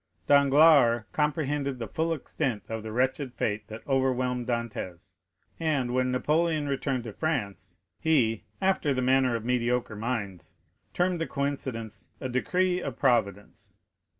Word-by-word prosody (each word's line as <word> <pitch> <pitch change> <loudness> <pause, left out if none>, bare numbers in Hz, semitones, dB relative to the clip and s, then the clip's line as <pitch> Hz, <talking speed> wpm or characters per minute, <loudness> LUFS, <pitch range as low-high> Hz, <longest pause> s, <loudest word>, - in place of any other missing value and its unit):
Danglars 140 -4 +5
comprehended 145 -2 -1
the 115 -2 -5
full 165 +1 -1
extent 130 -6 -2
of 110 0 -3
the 110 0 -7
wretched 130 +2 -1
fate 105 -1 -2
that 110 +1 -10
overwhelmed 130 -2 0
Dantès; 100 -7 -4 0.5
and, 145 -7 0
when 130 0 +1
Napoleon 155 +3 +1
returned 135 -2 -1
to 115 -3 -7
France, 100 0 -3 0.2
he, 125 -9 +2 0.2
after 190 -7 +1
the 130 - 0
manner 130 -1 +3
of 115 -1 -4
mediocre 125 -2 0
minds, 105 -5 -4 0.4
termed 180 -1 +1
the 165 - -1
coincidence, 125 -7 -4
a - - -3
decree 180 +8 +1
of 135 -7 -5
Providence. 105 -7 -1
130 Hz, 135 wpm, -27 LUFS, 115-145 Hz, 0.5 s, Danglars